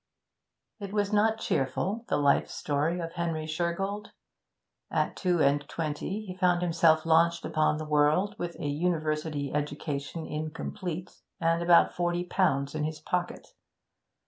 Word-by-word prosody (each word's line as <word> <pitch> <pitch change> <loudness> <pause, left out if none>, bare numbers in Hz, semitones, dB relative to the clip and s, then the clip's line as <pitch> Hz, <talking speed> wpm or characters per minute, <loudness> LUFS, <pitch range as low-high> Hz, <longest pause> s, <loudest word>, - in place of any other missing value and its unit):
It 200 -2 -6
was 205 0 0
not 220 +1 +3
cheerful, 195 - -1
the - - +2
life 145 -1 +3
story 150 +4 -1
of 165 -1 -5
Henry 165 -2 -2
Shergold. 175 +6 -2 0.8
At - - 0
two 180 -3 +1
and 140 +1 +3
twenty 165 +7 -3
he 185 -2 -7
found 180 -1 +2
himself 165 -2 +3
launched 170 +1 +3
upon 155 -1 +1
the 155 - -5
world, 150 +7 +2
with 175 -1 -4
a - - -4
university 155 -2 -1
education 145 +1 -3
incomplete 160 +3 -5 0.2
and 165 0 +2
about 170 0 +5
forty 175 0 0
pounds 145 -7 +1
in 155 -1 -2
his 155 0 -3
pocket. 175 +3 -3
165 Hz, 140 wpm, -28 LUFS, 150-180 Hz, 0.8 s, about